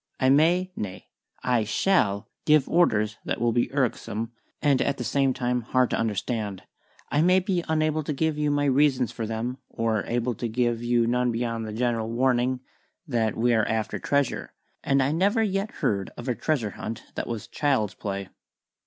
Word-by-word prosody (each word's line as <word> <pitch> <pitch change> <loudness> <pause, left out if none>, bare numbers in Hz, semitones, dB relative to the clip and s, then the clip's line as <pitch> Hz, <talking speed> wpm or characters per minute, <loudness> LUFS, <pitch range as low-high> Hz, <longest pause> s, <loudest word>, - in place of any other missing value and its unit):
I 130 - +3
may 170 +6 +4
nay, 95 -3 -6 0.3
I 125 -3 +2
shall 105 - +1 0.2
give 150 -3 +5
orders 110 -11 +2
that - - -2
will 120 0 +2
be 120 +1 +1
irksome 115 -4 -1 0.3
and 140 -4 +3
at 140 -1 0
the - - -3
same 135 +3 +2
time 125 -1 -1
hard 125 +2 +1
to - - +2
understand. 105 -2 -2 0.5
I 145 - +3
may 180 +3 +5
be 180 -2 -1
unable 155 0 +1
to - - -2
give 155 +2 0
you 150 0 0
my 145 0 +1
reasons 135 -3 +3
for 115 - -4
them; 115 +4 -3
or 110 -3 0
able 120 +1 0
to 120 +2 -3
give 120 0 0
you 120 -1 +2
none 125 +1 +1
beyond 115 -1 -2
the - - -5
general 115 0 -1
warning 125 +1 +1 0.5
that 115 -5 0
we 120 +1 +3
are 110 -2 +2
after 110 -1 -1
treasure, 140 -3 -1 0.3
and 135 -1 +3
I 135 - +1
never 200 +8 +2
yet 195 0 -1
heard 100 - -1
of 120 - -7
a 125 - +2
treasure 120 -5 -1
hunt 110 +3 -6
that - - -4
was 115 -3 -4
child's 130 -9 0
play." 100 0 -5
125 Hz, 185 wpm, -26 LUFS, 110-145 Hz, 0.5 s, give